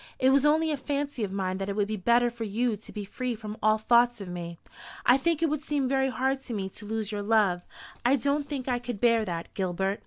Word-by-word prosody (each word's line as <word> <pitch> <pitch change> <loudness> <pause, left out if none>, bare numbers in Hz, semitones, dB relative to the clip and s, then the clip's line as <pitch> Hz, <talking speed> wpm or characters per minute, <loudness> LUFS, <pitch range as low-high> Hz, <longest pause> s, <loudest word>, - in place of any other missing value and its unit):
It 260 0 +4
was 280 +2 +4
only 315 +1 +3
a 295 - -1
fancy 280 -2 -2
of 200 - -2
mine 190 -1 -2
that 195 +1 -3
it 200 - -2
would 205 -1 +1
be 215 - -2
better 235 +4 +3
for 235 -1 -6
you 225 +2 0
to 210 - -12
be 210 -2 -5
free 250 +4 -3
from 215 -1 -7
all 215 0 +4
thoughts 240 +2 +3
of 200 - -7
me. 170 -1 -6 0.5
I 245 - +7
think 330 +3 +1
it 325 - +3
would 305 -1 -1
seem 290 -3 -1
very 265 0 +2
hard 265 +1 0
to 240 -4 -5
me 190 -2 -3
to 205 +2 -11
lose 220 -1 -2
your 205 -1 -3
love. 205 -4 +2 0.4
I 250 +3 +4
don't 285 +3 0
think 275 -4 -4
I 245 -2 +1
could 245 -3 -5
bear 230 -1 +4
that, 170 -3 -5
Gilbert." 190 +1 -1
235 Hz, 255 wpm, -28 LUFS, 205-265 Hz, 0.5 s, I